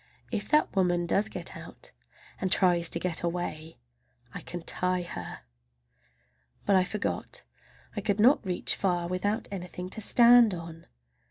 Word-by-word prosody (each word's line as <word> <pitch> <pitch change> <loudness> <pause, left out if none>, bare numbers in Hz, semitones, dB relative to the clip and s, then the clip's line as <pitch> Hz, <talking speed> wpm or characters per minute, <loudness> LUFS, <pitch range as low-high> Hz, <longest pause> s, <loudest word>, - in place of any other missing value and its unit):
If - - -3
that 300 -7 +2
woman 175 -2 +2
does 200 +5 +1
get 180 -4 -4
out, - - -9 0.5
and 185 - -2
tries 175 -3 +3
to 170 - -1
get 170 -2 -3
away, 170 -2 -4 0.6
I - - -6
can 175 -1 -7
tie 180 +1 0
her! 170 - -7 1.2
But 200 - +3
I 185 - +5
forgot 210 - -4 0.5
I 205 - -2
could 205 0 -1
not 250 +7 +5
reach 180 -3 0
far 175 -3 0
without 205 +5 -2
anything 180 -1 -6
to 220 - -4
stand 235 -2 +6
on! 165 -1 -10
185 Hz, 150 wpm, -28 LUFS, 175-205 Hz, 1.2 s, stand